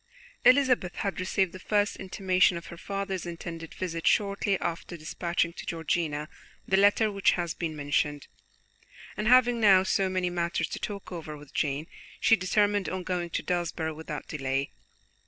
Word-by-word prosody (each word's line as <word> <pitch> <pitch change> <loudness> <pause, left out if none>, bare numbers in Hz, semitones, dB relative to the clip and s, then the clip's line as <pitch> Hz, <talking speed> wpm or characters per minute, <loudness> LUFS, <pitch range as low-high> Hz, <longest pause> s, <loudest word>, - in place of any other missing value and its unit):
Elizabeth 250 -9 +4
had 195 -3 -2
received 185 0 +1
the 185 - -9
first 205 +1 +1
intimation 185 -1 +2
of 170 - -8
her - - -7
father's 195 -1 -4
intended 165 -1 -7
visit 165 -3 -3
shortly 200 -1 +2
after 170 +1 -4
dispatching 170 +2 -1
to - - -8
Georgiana 160 -2 -2 0.4
the 190 - +3
letter 205 +2 +4
which 200 -1 +3
has 170 -2 -2
been 160 -2 -4
mentioned, 145 0 -1 0.9
and 210 +2 -2
having 245 -1 +5
now 195 -3 +7
so 190 0 +1
many 185 -1 -1
matters 170 -1 -1
to - - -5
talk 200 -2 -6
over 155 -3 -6
with 145 -1 -15
Jane, 145 0 -1 0.3
she 225 - +5
determined 205 +1 +1
on 185 0 -4
going 175 -1 -2
to - - -3
Desborough 170 -3 -2
without 150 -2 -7
delay. 135 -1 -2
180 Hz, 160 wpm, -28 LUFS, 165-195 Hz, 0.9 s, now